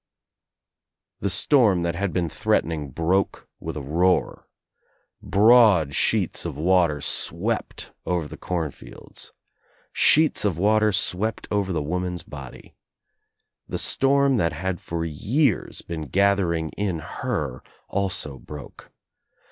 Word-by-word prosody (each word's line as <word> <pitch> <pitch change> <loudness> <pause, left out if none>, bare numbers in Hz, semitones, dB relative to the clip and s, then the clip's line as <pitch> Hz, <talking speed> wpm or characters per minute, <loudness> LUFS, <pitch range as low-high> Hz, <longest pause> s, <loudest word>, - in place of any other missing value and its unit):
The - - -1
storm 105 -11 +3
that 85 0 -1
had 100 +2 -2
been 90 -2 -1
threatening 80 -1 -1
broke 85 +8 -1
with - - -6
ii 75 - -5
roar. 85 +6 0 0.7
Broad 105 - +5
sheets - - +1
of - - -5
water 85 -3 +2
swept - - -2
over 85 -4 -1
the - - -9
corn 85 -5 -3
fields. - - -7 0.6
Sheets 155 0 +5
of 100 -6 0
water 110 +3 +3
swept 100 +3 0
over 100 -2 0
the 80 - -1
woman's 90 +3 -3
body. 70 -3 -11 0.9
The - - -3
storm 140 -1 +3
that 85 -6 +1
had 90 +2 -3
for 85 0 -4
years 115 - 0
been 80 -3 -6
gathering 95 -3 +1
in 100 -2 -2
her 65 -4 -4 0.3
also 95 -8 -2
broke. 75 -1 -11
90 Hz, 120 wpm, -24 LUFS, 80-100 Hz, 0.9 s, Broad